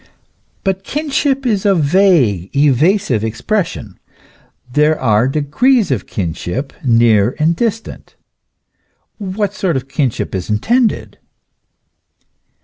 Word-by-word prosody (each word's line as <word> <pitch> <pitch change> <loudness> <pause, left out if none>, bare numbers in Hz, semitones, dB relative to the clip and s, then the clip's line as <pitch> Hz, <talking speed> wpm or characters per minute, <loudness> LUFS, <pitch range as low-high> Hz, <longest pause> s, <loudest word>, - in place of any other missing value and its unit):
But 195 -1 -1
kinship 280 -1 -1
is 210 -6 0
a 200 -2 +3
vague, 150 - +2
evasive 145 - +2
expres 165 - -1
sion. 105 - -10 0.7
There 150 +2 +2
are 115 -1 +2
degrees 170 - +1
of 125 - -2
kinship, 90 - -4
near 115 -2 +3
and 160 +2 +1
distant. 225 +2 -4 1.0
What 200 0 -3
sort 180 -7 -1
of 130 0 -6
kinship 135 -4 -2
is 95 0 -4
intended 225 - 0
150 Hz, 105 wpm, -16 LUFS, -, 1.0 s, a